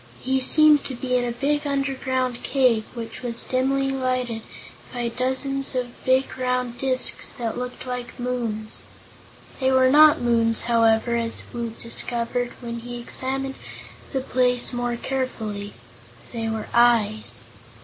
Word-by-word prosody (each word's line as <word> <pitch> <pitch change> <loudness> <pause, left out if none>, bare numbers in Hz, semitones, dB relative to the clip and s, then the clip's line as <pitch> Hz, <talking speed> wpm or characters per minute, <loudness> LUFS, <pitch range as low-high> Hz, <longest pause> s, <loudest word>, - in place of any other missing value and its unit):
He 265 +1 +1
seemed 300 +2 +6
to 260 - -3
be 250 +1 -2
in 250 - +2
a 240 - -1
big 290 +5 -1
underground 260 -3 -1
cave, 250 -5 +2
which 230 0 -7
was 240 -2 -2
dimly 270 +1 +1
lighted 255 -3 -1 0.5
by 240 -1 -2
dozens 265 +3 -1
of 245 -1 -4
big 260 0 +1
round 250 -1 -1
discs 260 -1 +2
that 230 -2 -3
looked 250 +1 -6
like 250 0 -6
moons. 235 -3 -3 0.8
They 260 -1 +2
were 260 0 +5
not 305 +1 +7
moons, 230 -2 +2
however, 230 0 +3
as 230 -1 -3
Woot 235 -1 -5
discovered 240 +1 0
when 235 -1 -5
he 245 +1 -8
had 240 - -7
examined 270 +2 -3 0.6
the 265 - -1
place 250 -1 +1
more 245 0 -1
carefully. 220 -6 -4 0.6
They 225 -1 -2
were 220 -1 -3
eyes. 225 - +3
250 Hz, 140 wpm, -23 LUFS, 235-260 Hz, 0.8 s, not